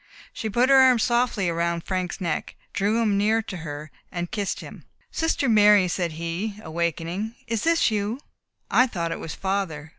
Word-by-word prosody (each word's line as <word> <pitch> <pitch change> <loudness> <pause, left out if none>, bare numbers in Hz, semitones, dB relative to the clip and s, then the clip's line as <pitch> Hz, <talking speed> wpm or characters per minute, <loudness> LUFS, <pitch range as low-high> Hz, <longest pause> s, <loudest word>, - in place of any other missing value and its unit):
She 220 - -4
put 240 +5 +2
her 270 - +7
arm 260 -2 +7
softly 235 -6 +1
round 170 0 -1
Frank's 185 0 -3
neck, 170 -5 -3 0.2
drew 210 +2 +1
him 205 -3 +2
near 220 +2 +2
to 195 -4 -6
her, 150 -2 -7 0.2
and 175 0 -4
kissed 205 -3 -2
him. - - -11 0.3
"Sister 325 -4 0
Mary," 210 -3 +6
said 175 -2 -2
he, 170 +6 -3
awaking, 170 +6 -3
"is 230 -2 -2
this 330 -7 +3
you? 215 +4 -1 0.5
I 255 - +5
thought 170 -7 -3
it - - -4
was 160 - -6
father. 190 -6 -2
200 Hz, 175 wpm, -24 LUFS, 170-225 Hz, 0.5 s, her